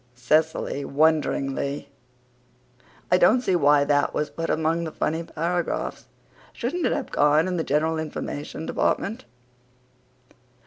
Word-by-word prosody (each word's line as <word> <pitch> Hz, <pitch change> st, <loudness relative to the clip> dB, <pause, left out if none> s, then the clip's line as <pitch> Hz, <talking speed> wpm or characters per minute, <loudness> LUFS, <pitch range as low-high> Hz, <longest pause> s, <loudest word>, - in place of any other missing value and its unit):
(CECILY, 150 Hz, +3 st, 0 dB
WONDERINGLY: 140 Hz, -2 st, 0 dB, 1.2 s
"I 180 Hz, -, +6 dB
don't 220 Hz, +8 st, +5 dB
see 190 Hz, -7 st, +1 dB
why 145 Hz, -3 st, +4 dB
that 145 Hz, 0 st, +1 dB
was 150 Hz, -, -1 dB
put 165 Hz, 0 st, -4 dB
among 160 Hz, +2 st, 0 dB
the 160 Hz, -, -4 dB
funny 160 Hz, +2 st, -1 dB
paragraphs. 170 Hz, +1 st, -3 dB, 0.5 s
Shouldn't 295 Hz, +8 st, -2 dB
it -, -, 0 dB
have -, -, -3 dB
gone 150 Hz, +3 st, +3 dB
in 180 Hz, -1 st, -2 dB
the 165 Hz, -, 0 dB
General 160 Hz, +3 st, 0 dB
Information 155 Hz, 0 st, -5 dB
department?") 210 Hz, +6 st, -1 dB
160 Hz, 125 wpm, -24 LUFS, 145-170 Hz, 1.2 s, I